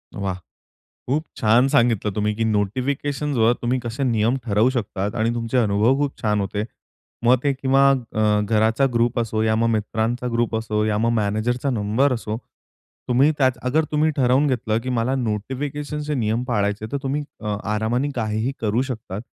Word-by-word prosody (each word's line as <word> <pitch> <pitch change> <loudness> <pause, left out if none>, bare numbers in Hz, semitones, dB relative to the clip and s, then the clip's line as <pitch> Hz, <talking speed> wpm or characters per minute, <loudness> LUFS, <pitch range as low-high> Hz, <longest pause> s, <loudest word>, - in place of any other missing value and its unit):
वाह! 100 -2 -2 0.7
खूप 150 +5 0
छान 115 +5 +4
सांगितलं 115 -7 +2
तुम्ही, 105 +1 0
की 115 +1 -1
नोटिफिकेशन्स 130 +7 -1
वर 115 +1 +4
तुम्ही 125 +2 +1
कसे 120 +3 -5
नियम 115 0 +2
ठरवू 110 +2 +2
शकतात 105 -4 -3
आणि 115 -1 +1
तुमचे 115 +2 -1
अनुभव 110 +3 +3
खूप 145 -1 -2
छान 105 -2 +1
होते. 100 +2 -2 0.6
मग 125 +2 +6
ते 140 - +2
किंवा 135 +1 +3
अ, 110 -5 +1
घराचा 110 +5 +2
ग्रुप 120 +1 +1
असो 110 -1 -1
या 110 0 +2
मग 115 +1 +2
मित्रांचा 110 +3 -1
ग्रुप 115 0 0
असो, 110 -1 -1
या 105 -1 0
मग 115 +2 +2
मॅनेजरचा 115 +5 0
नंबर 115 +4 +1
असो, 110 -2 -3 0.7
तुम्ही 130 +4 +4
त्याच 130 -3 +2
अगर 155 +5 +2
तुम्ही 155 +1 +3
ठरवून 130 +2 +3
घेतलं 120 -5 0
की 130 - -6
मला 120 +4 0
नोटिफिकेशनचे 145 +6 -3
नियम 115 -2 0
पाळायचे 105 -3 -1
तर - - 0
तुम्ही 140 +2 -1 0.2
अ, 105 -1 -2 0.2
आरामाने 120 +6 0
काहीही 110 +1 -1
करू 110 +2 +1
शकतात. 115 -6 -5
115 Hz, 170 wpm, -22 LUFS, 110-130 Hz, 0.7 s, मग